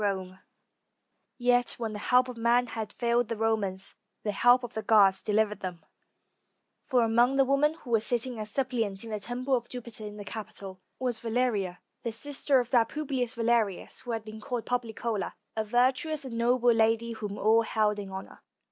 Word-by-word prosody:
303 190 -3 -1
ROME 185 - -19 1.0
Yet, 245 0 +2
when 225 -2 -3
the 210 - -5
help 250 +4 +3
of 250 - -6
man 235 +2 +3
had 220 -3 -5
failed 235 -1 +1
the 230 - -3
Romans, 205 -4 -1 0.3
the 210 - 0
help 245 +5 +5
of 245 - -6
the 220 - -3
gods 200 -4 +5
delivered 210 0 +1
them; 180 -3 -6 1.0
for 250 -2 +3
among 235 +4 +3
the 270 0 +4
women 280 +3 +2
who 255 -6 -11
were 225 - +5
sitting 240 +2 -1
as 215 0 -4
suppliants 230 -6 -1
in 225 - -8
the 215 - -2
temple 250 +5 -3
of 240 -2 0
Jupiter 235 -3 -7
in 210 0 -9
the 205 - -8
Capitol, 195 -3 -7 0.2
was 250 -3 -2
Valeria, 220 -6 -1 0.2
the 235 - -3
sister 275 +3 +1
of 245 -1 -3
that 235 -3 +4
Publius 265 -6 -2
Valerius 230 -4 0
who 260 - -12
had 225 -1 -4
been 215 0 -9
called 240 +1 -3
Poplicola, 230 -4 -2 0.2
a 220 - 0
virtuous 260 +7 +1
and 245 -3 -6
noble 240 +1 +3
lady 225 +1 +2
whom 210 -2 -5
all 220 +2 +4
held 215 -2 +1
in 200 -1 -6
honor. 190 0 -8
230 Hz, 190 wpm, -29 LUFS, 210-245 Hz, 1.0 s, help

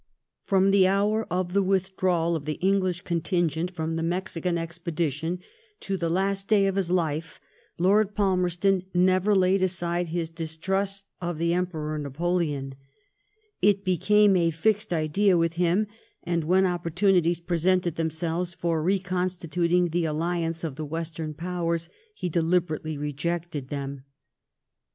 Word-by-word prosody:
From 195 -1 +3
the 195 -2 +5
hour 205 +3 +1
of 180 0 -1
the 200 - +4
withdrawal 185 -3 +1
of 150 -3 -4
the 155 - -1
English 185 -2 +1
con 170 -3 -2
tingent 175 -1 0
from 165 -2 -3
the - - -1
Mexican 175 0 -1
expedition 165 -1 -2 0.4
to 195 - -2
the 170 -3 -1
last 195 +3 0
day 205 -2 +4
of 195 -1 0
his 190 -3 0
life, 165 -3 -1 0.4
Lord 205 +3 +3
Palmerston 185 -1 +1
never 185 +3 +3
laid 190 0 +3
aside 175 -1 0
his 165 0 -3
distrust 190 +5 -2 0.2
of 175 -2 -3
the 170 +1 +1
Emperor 160 -4 -2
Napoleon, 145 -1 -1 0.9
It 200 0 +3
became 205 +3 +4
a 170 -2 +3
fixed 205 +6 0
idea 175 +4 +2
with 165 0 +1
him, 175 +4 +2 0.4
and 170 -2 -1
when 185 +3 +4
opportunities 175 0 +2
presented 175 0 +1
themselves 165 +2 -2
for 165 -2 -1
reconstituting 180 -1 0
the 170 +1 0
alliance 165 +1 -1
of 150 -4 -4
the 155 - -4
Western 160 0 -4
Powers 170 0 -2 0.3
he 180 - -3
deliberately 160 -2 0
rejected 150 0 -3
them. 140 -1 -5
175 Hz, 135 wpm, -26 LUFS, 165-185 Hz, 0.9 s, the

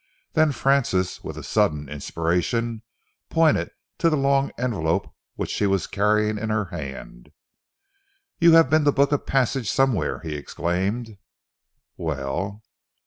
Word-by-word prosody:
Then 155 -2 +4
Francis, 125 -9 +1
with - - -7
a - - -7
sudden 75 -1 +1
inspiration, 90 - -1 0.5
pointed 165 -2 +3 0.3
to 165 - +4
the 155 - +1
long 140 0 +2
envelope 95 -8 -1 0.2
which - - -4
she 105 - +1
was 95 -1 +1
carrying 105 +1 +1
in 110 +1 -3
her 105 -1 0
hand. 65 -6 -8 1.1
"You 170 -1 +6
have 165 -3 +7
been 155 +3 +3
to 145 - +5
book 140 0 +2
a 145 - +2
passage 130 -3 0
somewhere!" 135 -6 +1
he 80 - -5
exclaimed. 95 +9 -3 0.8
"Well?" 85 +8 -3
105 Hz, 135 wpm, -24 LUFS, 85-135 Hz, 1.1 s, have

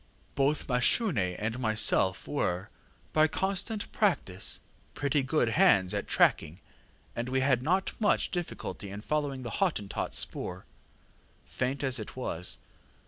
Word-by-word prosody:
Both 140 +2 +1
Mashune 125 - +2
and 115 +3 -3
myself 110 -5 +2
were, 95 -9 -2 0.4
by 155 0 +5
constant 195 +5 -2
practice, 170 - 0 0.3
pretty 145 0 +1
good 130 -2 +1
hands 115 - +4
at - - -2
tracking, 80 +3 +2 0.6
and 120 +2 -3
we 130 0 +1
had 130 -2 +3
not 185 +8 +1
much 210 - +2
difficulty 170 - -5
in 100 +1 -7
following 140 0 -2
the 120 - -5
HottentotŌĆÖs 130 - -1
spoor, 90 +1 -2 0.8
faint 130 +3 -2
as 130 -3 +1
it 110 - -7
was. 90 -9 -2
130 Hz, 130 wpm, -29 LUFS, 105-155 Hz, 0.8 s, by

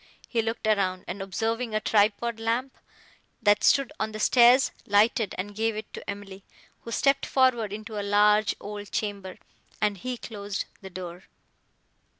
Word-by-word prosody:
He 230 - 0
looked 225 0 -4
around, 195 -4 +1
and, 195 - -5
observing 225 +4 -2
a - - +3
tripod 215 +2 +1
lamp, 235 +4 -1 0.6
that 205 -3 +3
stood 275 -3 +3
on 220 0 -2
the 215 - -5
stairs, 245 +3 +5 0.2
lighted 210 +1 +3
and 205 +3 -4
gave 225 +1 -1
it 215 0 -7
to - - -8
Emily, 200 -1 -7 0.4
who 230 - -9
stepped 275 +3 +2
forward 245 -6 +2
into 215 0 -6
a - - -1
large 210 +1 +3
old 205 0 -8
chamber, 200 -3 -3 0.4
and 205 -2 0
he 250 +5 -4
closed 205 -4 -5 0.2
the 190 - -9
door. 180 -1 -8
215 Hz, 155 wpm, -26 LUFS, 200-230 Hz, 0.6 s, stairs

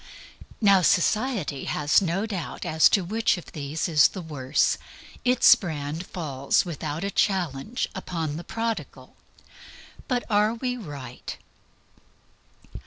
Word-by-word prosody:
Now, 200 -3 +6
society 190 - +1
has 150 +5 +2
no 190 +3 -1
doubt 190 -8 -4
whatever 165 -3 -3
as 160 - +7
to 195 - +2
which 220 +4 +1
of 175 - -10
these 150 +3 -3
is 150 -5 +6
the 190 - -8
worse. 145 -3 0 0.4
Its 250 -1 +7
brand 160 -5 -4
falls, 140 -5 0
without 155 -1 -4
a 200 - -2
challenge, 190 - 0
upon 165 -5 -4
the 170 - -6
Prodigal. 205 - -5 0.9
But 250 -3 0
are 210 +1 +2
we 250 +1 -2
right? 145 - -8
175 Hz, 125 wpm, -25 LUFS, 150-210 Hz, 0.9 s, as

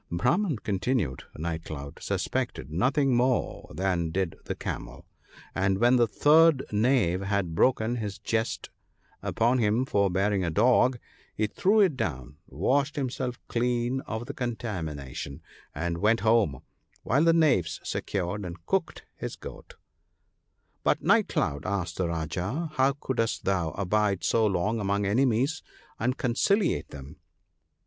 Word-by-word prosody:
'The 85 - -3
Brahman/ 150 - +1
continued 105 - -1
Night 80 +1 -3
cloud, 70 -3 -8
'suspected 70 +3 -2
nothing 130 - +2
more 125 +1 0
than 90 -3 -1
did 90 0 -1
the - - -3
Camel; - - -6 0.5
and 95 0 +1
when 120 +4 +4
the 120 -1 +4
third 150 +4 +5
knave 105 -5 +2
had 95 -3 -1
broken 120 +5 +2
his 105 -4 -4
jest 115 0 -2 0.5
upon 120 +3 +1
him 110 +3 +2
for 100 -6 +2
bearing 95 +1 +1
a 85 - 0
dog, 125 +7 +3 0.4
he 110 - +1
threw 200 - +2
it 185 -8 +3
down, 70 - -4
washed 140 +2 0
himself 130 -2 -3
clean 120 +2 0
of 110 +1 -4
the 140 - -6
contami 110 - -3
nation, 70 0 -7 0.4
and 85 +3 -2
went 110 +3 +3
home; 110 - +2 0.4
while 140 +5 +2
the 165 - +6
knaves 145 - +2
secured 100 +1 -3
and 85 -2 -8
cooked - - -1
his - - -5
goat/ - - -11 0.6
' - - -47
But, - - +1
Night - - +4
cloud,' 70 +4 -1
asked 90 -4 -2
the 90 - 0
Rajah, 90 - -3
' - - -21
how 135 -1 +3
couldst 130 -5 -2
thou 95 -4 +1
abide 100 0 0
so 115 -1 +3
long 105 +4 0
among 100 0 0
enemies, 130 +7 +1 0.4
and 125 +3 0
conciliate 150 - +1
them 70 +2 -10
105 Hz, 145 wpm, -27 LUFS, 90-125 Hz, 0.6 s, the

